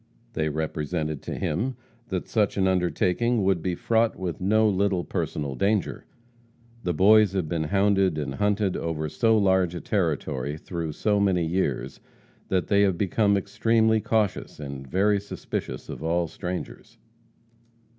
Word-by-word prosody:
They 80 -5 0
represented 75 0 -3
to - - -5
him 130 +2 -2 0.3
that 95 -5 -3
such 105 -4 +1
an 95 -1 +3
undertaking 95 +5 +1
would 95 -3 +2
be 90 0 -1
fraught 115 +4 +1
with 90 -2 -5
no 110 +4 +3
little 100 -2 +1
personal 70 -3 -3
danger. 100 - -1 0.8
The 90 - -1
Boys 105 +2 +5
have 95 -5 -1
been 80 -1 -1
hounded 95 -1 +2
and 75 - -3
hunted 105 -2 0
over 80 -2 -2
so 110 +8 +2
large 95 -3 +2
a - - -3
territory, 75 -7 -1
through 85 -1 -5
so 105 +5 +1
many 95 -4 +2
years, 80 -6 -2 0.5
that 95 -1 0
they 100 -1 +3
have 95 -3 +2
become 100 +2 +2
extremely 110 +3 +2
cautious, 105 -6 -1
and 70 -2 -7
very 100 +6 +2
suspicious 65 -9 -5
of - - -7
all 85 +1 0
strangers. 90 -7 -6
95 Hz, 145 wpm, -25 LUFS, 80-105 Hz, 0.8 s, Boys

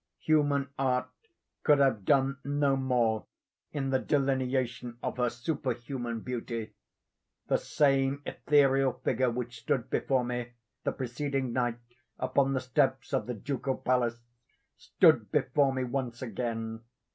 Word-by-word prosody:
Human 145 -3 +2
art 130 -1 +1 0.5
could 150 -2 +5
have 130 -8 +2
done 135 0 +3
no 145 -1 +2
more 120 -5 +1 0.4
in 135 -2 -2
the 130 - +3
delineation 130 -3 0
of - - -3
her 125 -1 +2
superhuman 120 -2 -3
beauty. 115 -2 -4 0.8
The - - +3
same 135 -1 +2
ethereal 135 -3 +3
figure 130 +1 +2
which 120 0 -4
stood 125 -2 -1
before 130 -2 +1
me 120 0 -4 0.3
the - - +2
preceding 130 0 -2
night 120 -2 0 0.4
upon 135 +1 +1
the 130 - 0
steps 130 -1 0
of - - 0
the 125 - -3
Ducal 135 +3 -2
Palace, 120 -2 +1 0.6
stood - - +3
before 140 -2 +2
me 130 -1 -1
once 125 -1 -3
again. 115 -1 -3
130 Hz, 130 wpm, -30 LUFS, 120-135 Hz, 0.8 s, could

